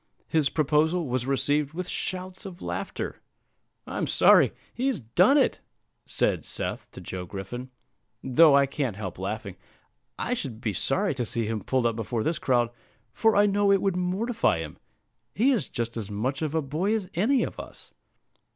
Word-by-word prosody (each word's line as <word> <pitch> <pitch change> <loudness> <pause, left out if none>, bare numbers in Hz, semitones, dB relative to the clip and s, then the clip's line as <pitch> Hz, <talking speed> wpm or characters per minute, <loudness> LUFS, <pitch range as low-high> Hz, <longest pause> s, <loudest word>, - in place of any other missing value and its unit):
His 155 -3 +2
proposal 155 +3 +2
was 125 0 -1
received 145 +2 +1
with 180 0 -3
shouts 185 0 -3
of 185 -3 -9
laughter. - - -4 0.6
"I'm - - -3
sorry - - +6 0.2
he's 260 -3 -1
done 175 - +4
it," 275 - +2 0.5
said - - +1
Seth - - -4
to - - -9
Joe 90 -1 -6
Griffin, 115 +8 -6 0.5
"though 140 +3 +6
I 140 - +5
can't 135 -5 -2
help 95 -4 -6
laughing. - - -4 0.6
I 250 - -1
should 135 - -4
be 110 -3 -2
sorry 190 - 0
to 130 -2 -2
see 115 0 -2
him 110 -1 -2
pulled 130 +2 0
up 115 -1 +2
before 115 0 -2
this 160 0 -1
crowd, 120 -3 +2 0.4
for 225 - +3
I 205 +1 +6
know 205 0 +3
it 195 - +5
would 195 -1 0
mortify 190 - +1
him; 80 -2 -7 0.6
he 250 +7 +4
is 245 - 0
just 115 -1 -3
as 110 -3 -5
much 125 +8 -2
of 155 0 -2
a 160 - +1
boy 165 +10 0
as 205 -4 -3
any 235 +10 +2
of - - -5
us." - - -10
150 Hz, 175 wpm, -26 LUFS, 120-190 Hz, 0.6 s, sorry